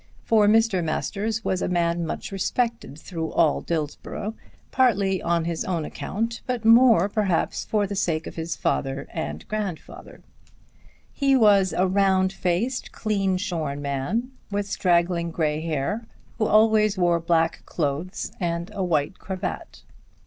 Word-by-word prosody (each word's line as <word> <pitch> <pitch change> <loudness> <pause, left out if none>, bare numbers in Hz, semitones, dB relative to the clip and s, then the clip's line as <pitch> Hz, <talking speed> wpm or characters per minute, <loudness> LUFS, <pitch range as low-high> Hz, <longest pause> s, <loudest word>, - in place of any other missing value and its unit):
For 215 -2 +4
Mr. 220 -4 +3
Masters 210 +7 -2
was 185 - 0
a - - 0
man 170 -1 0
much - - -5
respected 230 - -2
through 160 -1 -5
all 160 -3 +3
Dillsborough, 165 +6 -4 0.4
partly 200 -8 +2
on 170 -1 0
his 170 -1 -2
own 170 -4 -2
account, 230 +8 -4
but 245 -3 -2
more 230 -4 +6
perhaps 200 -4 0
for 210 -2 +1
the 200 +1 -4
sake 160 -4 0
of - - -7
his 165 +1 -3
father 135 0 -2
and 75 +1 -5
grandfather. 205 -6 -6 0.9
He 275 -1 +2
was 200 -6 +5
a 185 - +1
round 190 0 +2
faced, 195 +8 -1
clean 195 -4 0
shorn 160 -7 -3
man, 140 - -2 0.2
with 205 0 -1
straggling 175 -3 +1
grey 155 -2 -1
hair, 165 +8 -2 0.3
who 215 - +2
always 215 -1 +4
wore 175 -2 +3
black 165 0 +1
clothes 155 +4 -3
and 170 -1 -2
a 195 - -2
white 165 0 0
cravat. 190 -1 -5
185 Hz, 140 wpm, -24 LUFS, 165-215 Hz, 0.9 s, more